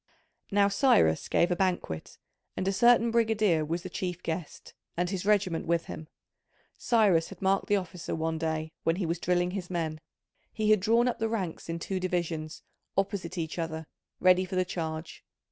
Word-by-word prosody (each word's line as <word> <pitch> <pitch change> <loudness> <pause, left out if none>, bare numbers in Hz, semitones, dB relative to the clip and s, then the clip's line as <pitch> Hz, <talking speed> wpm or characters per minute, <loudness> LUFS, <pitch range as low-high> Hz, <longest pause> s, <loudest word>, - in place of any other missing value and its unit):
Now 200 -1 +4
Cyrus 195 - +3
gave 175 +1 +2
a - - +2
banquet 175 - -2 0.4
and 185 - -1
a 195 - +2
certain 235 +1 +5
brigadier 215 -8 +2
was 165 +3 -3
the 185 - -6
chief 180 -1 -4
guest, 165 -1 -5 0.2
and 175 +1 0
his 190 0 -3
regiment 190 -7 +2
with 170 0 +1
him. 155 - -8 0.7
Cyrus 205 -9 +3
had 195 - -11
marked 195 0 +1
the 205 - +3
officer 180 -3 -4
one 160 0 -2
day 160 -1 -2
when 165 - +1
he 185 0 -2
was 165 +1 -2
drilling 175 0 +1
his 185 -2 -5
men; 160 -3 -3 0.5
he 215 -1 +1
had 215 - +6
drawn 230 +5 +3
up 245 - -1
the 225 0 0
ranks 190 -8 -3
in 165 - -2
two 185 +3 -3
divisions, 170 -4 -3 0.3
opposite 195 -3 -1
each 165 +1 -3
other, 160 -1 -3 0.3
ready 185 0 +5
for 185 0 -5
the 185 0 +2
charge. 160 -3 -5
180 Hz, 180 wpm, -29 LUFS, 165-200 Hz, 0.7 s, had